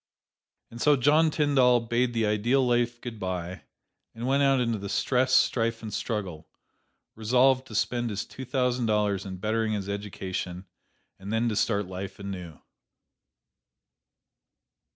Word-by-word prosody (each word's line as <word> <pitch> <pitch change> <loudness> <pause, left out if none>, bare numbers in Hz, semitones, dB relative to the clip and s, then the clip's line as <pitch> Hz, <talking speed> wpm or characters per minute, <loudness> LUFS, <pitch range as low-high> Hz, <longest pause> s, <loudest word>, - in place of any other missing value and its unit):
And 120 +1 -9
so 150 -1 +5
John 150 +5 +4
Tyndall 135 -5 +3
bade 120 +1 0
the 115 -1 +1
ideal 120 +6 +2
life 120 -1 +1
good 115 -3 -7
by, 90 -1 -5 0.5
and 115 +2 -5
went 135 +2 +2
out 135 -1 +4
into 115 -3 0
the 100 0 -6
stress, 130 +4 +1
strife 115 -1 +2
and 110 -2 -6
struggle, 105 -7 -4 0.6
resolved 130 +4 +2
to 110 - -9
spend 120 +3 0
his 105 -1 -3
two 130 - -9
thousand 125 -2 0
dollars 105 -2 +1
in 95 -1 -6
bettering 110 +2 -1
his 100 -2 -3
education, 95 -2 -5 0.5
and 95 +2 -7
then 115 +1 +1
to 110 - -2
start 105 -1 +1
life 95 +1 -7
anew. 90 -5 -7
115 Hz, 145 wpm, -27 LUFS, 100-125 Hz, 0.6 s, so